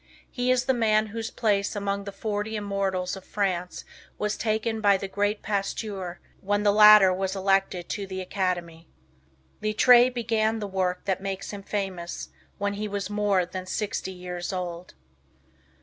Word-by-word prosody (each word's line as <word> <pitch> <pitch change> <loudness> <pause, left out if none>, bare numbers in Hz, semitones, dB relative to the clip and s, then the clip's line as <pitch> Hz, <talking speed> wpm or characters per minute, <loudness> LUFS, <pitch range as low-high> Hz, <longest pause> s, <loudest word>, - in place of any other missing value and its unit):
He 250 -1 -1
is 255 0 +3
the 265 - +3
man 215 -3 +3
whose 225 0 -3
place 205 -3 0
among 200 0 -2
the 200 - -5
forty 210 +1 -3
immortals 195 -3 -1
of 190 - -10
France 185 -4 -2 0.3
was 210 0 -1
taken 220 0 -1
by 200 -2 +5
the 195 - -5
great 205 +2 -1
Pasteur, 195 -2 -3 0.2
when 205 +1 0
the 205 - +5
latter 210 -3 +8
was 190 +1 -2
elected 195 -2 +1
to 200 -2 -3
the 190 0 -5
Academy. 180 -3 -3 0.7
Littre 240 +4 +6
BEGAN 225 -2 0
the 215 - -4
work 185 -2 -2
that 190 -1 -1
makes 195 -1 -4
him 205 -1 -7
famous 195 -4 -4 0.3
when 200 0 -1
he 210 +1 -3
was 200 -1 -4
more 205 -3 +2
than 185 +1 -7
sixty 200 0 -3
years 180 -1 -5
old. 180 -1 -5
200 Hz, 160 wpm, -26 LUFS, 185-215 Hz, 0.7 s, latter